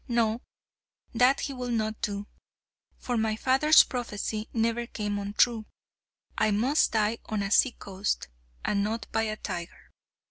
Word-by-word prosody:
No; 235 -1 +1 0.7
that 250 +3 +4
he 280 - -3
will 250 -1 -5
not 220 -2 -1
do. 205 0 -3 0.7
For 245 -1 -2
my 220 -1 +1
father's 270 +7 +5
prophecy 220 -3 -4
never 230 +1 0
came 205 -3 -3
untrue. 215 +2 +1 0.7
I 215 - +2
must 240 +9 +2
die 220 +1 +1
on 215 -2 -1
a 195 - -3
sea 245 +4 +4
coast, 195 - -3 0.4
and 200 -1 +1
not 220 +1 -2
by 225 - +1
a 215 0 -3
tiger." 170 -4 -7
220 Hz, 145 wpm, -28 LUFS, 210-240 Hz, 0.7 s, father's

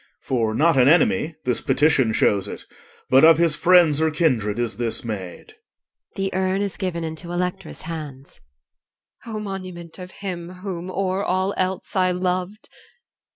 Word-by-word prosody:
For 115 -4 -1
not 160 +3 +3
an 125 - +5
enemy 220 - +3
this 125 -2 +1
petition 145 -6 +2
shows 100 -2 +1
it - - -8 0.5
But 130 +1 +6
of 160 0 +8
his 165 -2 +3
friends 165 -2 +4
or 160 - +3
kindred, 125 -10 0
is 120 -4 -2
this 120 0 -1
maid. 105 - -7 0.6
[The 195 -1 -2
urn 190 +1 0
is 200 -2 -4
given 175 -3 -3
into 160 +2 -6
ELECTRA'S 180 0 -4
hands 150 -5 -8 0.9
EL. 225 - -5
O - - -3
monument 185 -4 -7
of 180 0 -8
him 180 -3 -6
whom 180 -2 -5
o'er 190 +1 -1
all 190 +1 0
else 185 +2 -3
I 185 -1 +3
loved! 185 +3 -3
170 Hz, 155 wpm, -22 LUFS, 140-185 Hz, 0.9 s, of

